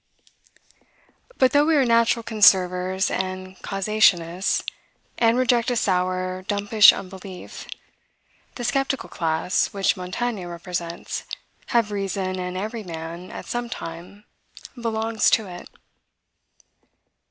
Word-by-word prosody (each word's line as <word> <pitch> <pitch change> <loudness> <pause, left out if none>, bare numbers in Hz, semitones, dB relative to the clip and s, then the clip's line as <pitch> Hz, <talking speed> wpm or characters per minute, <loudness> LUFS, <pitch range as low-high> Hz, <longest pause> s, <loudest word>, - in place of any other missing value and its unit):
But 260 -1 +4
though 290 +1 +5
we 320 0 +3
are 275 -3 +4
natural 230 0 +3
conservers 190 -3 +3
and 185 0 -4
causationists, 195 -3 +1 0.6
and 230 0 +4
reject 245 -2 +2
a 245 - 0
sour, 185 -2 0
dumpish 205 +1 +6
unbelief, 190 -1 -9 0.9
the 245 - -6
skeptical 270 +1 -1
class, 165 +1 0
which 195 -1 +2
Montaigne 195 +2 -3
represents, 175 0 -5 0.4
have 235 -4 +1
reason, 195 -2 -2
and 180 0 -4
every 220 +4 -4
man, 170 -1 -7
at - - -8
some 240 0 -3
time, 175 +2 -8 0.5
belongs 225 -2 0
to 220 - +2
it. 175 -1 -10
195 Hz, 105 wpm, -23 LUFS, 180-230 Hz, 0.9 s, dumpish